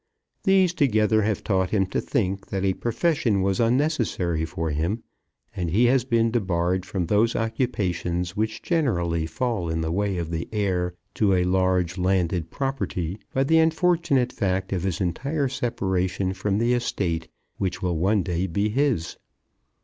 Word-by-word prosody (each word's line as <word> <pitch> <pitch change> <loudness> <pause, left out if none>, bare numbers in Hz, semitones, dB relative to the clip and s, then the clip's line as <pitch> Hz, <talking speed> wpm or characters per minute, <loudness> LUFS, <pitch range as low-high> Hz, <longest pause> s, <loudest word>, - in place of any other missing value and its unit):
These 190 -3 +4
together 110 -7 +3
have 105 -1 -1
taught 95 -3 +1
him 95 -2 +2
to - - 0
think 95 -2 -1
that 95 0 -2
a 95 - +2
profession 120 - 0
was 95 -1 0
unnecessary 115 - +1
for 80 0 -3
him, 85 +10 -1 0.5
and 90 -4 -2
he 110 +9 +3
has 125 0 +3
been 115 -2 +2
debarred 95 -4 0
from 90 -3 -2
those 105 +6 +2
occupations 95 -7 -1
which 110 +1 -2
generally 85 - 0
fall 100 -1 -2
in 80 0 -1
the 80 0 -2
way 100 +1 0
of 85 -1 -3
the 80 0 -3
heir 90 -4 -1 0.2
to 100 -3 +2
a 90 - +2
large 90 -1 +1
landed 90 -2 +1
property 110 - -3
by 135 - +1
the 160 +4 +4
unfortunate 160 -5 +2
fact 95 -1 -1
of 90 - -1
his 95 -2 -2
entire 140 - -1
separation 95 -7 -1
from 95 +1 -1
the 120 +2 +2
estate 90 -9 -1 0.3
which 95 -1 -2
will 90 -3 0
one 100 +3 +2
day 90 0 -1
be 100 +5 0
his. 130 - 0
95 Hz, 160 wpm, -24 LUFS, 90-120 Hz, 0.5 s, These